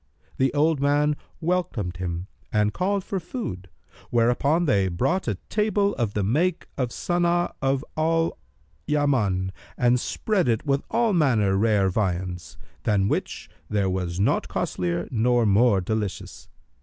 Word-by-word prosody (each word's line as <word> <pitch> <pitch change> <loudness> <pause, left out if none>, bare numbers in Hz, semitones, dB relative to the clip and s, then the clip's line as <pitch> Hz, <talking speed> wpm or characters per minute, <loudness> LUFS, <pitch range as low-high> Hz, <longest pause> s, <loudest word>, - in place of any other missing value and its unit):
The 135 0 +2
old 155 0 +3
man 145 +1 +2 0.3
welcomed 155 - -1
him 85 -1 -3 0.3
and 105 -1 +2
called 195 +2 0
for 195 - -3
food, 160 - -6 0.4
whereupon 125 +8 +2
they 100 - +2
brought 130 - 0
a 110 - 0
table 210 -1 +1
of 115 -4 -2
the 105 - +1
make 160 - +1
of 130 -4 -1
Sana'a 175 +5 0
of 135 +1 0
al 165 +1 +1 0.5
Yaman 115 -11 +1 0.3
and 125 0 +3
spread 200 - 0
it 115 +2 0
with 140 -1 +1
all 230 -1 +2
manner 115 - +3
rare 105 -1 +3
viands, 90 -5 -2 0.2
than 100 -2 +1
which - - -3 0.2
there 100 -3 +1
was 90 -1 -2
naught 100 - +1
costlier 90 -1 -2
nor 120 0 +2
more 105 0 +4
delicious. 105 +1 -4
120 Hz, 140 wpm, -25 LUFS, 95-160 Hz, 0.5 s, more